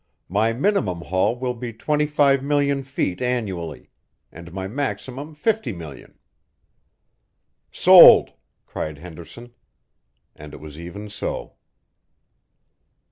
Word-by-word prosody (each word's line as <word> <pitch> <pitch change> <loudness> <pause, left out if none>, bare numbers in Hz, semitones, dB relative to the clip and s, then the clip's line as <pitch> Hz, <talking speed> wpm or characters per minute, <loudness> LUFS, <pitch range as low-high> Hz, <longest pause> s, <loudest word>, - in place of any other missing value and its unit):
My 105 +5 +1
minimum 115 - -1
haul 95 +7 0
will 125 0 -3
be 120 0 -7
twenty 150 +6 -1
five 140 -2 +2
million 140 -1 0
feet 130 -9 -3
annually, 95 - -4 0.4
and 85 +1 -12
my 95 +1 -5
maximum 135 +5 -5
fifty 210 - -1
million 80 -6 -11 0.8
" - - -51
"Sold!" - - +9 0.3
cried 75 -1 -6
Henderson. 90 +9 -12 0.8
And 75 0 -11
it - - -12
was 75 0 -11
even 85 +5 -8
so. 105 - -5
115 Hz, 110 wpm, -22 LUFS, 85-140 Hz, 0.8 s, Sold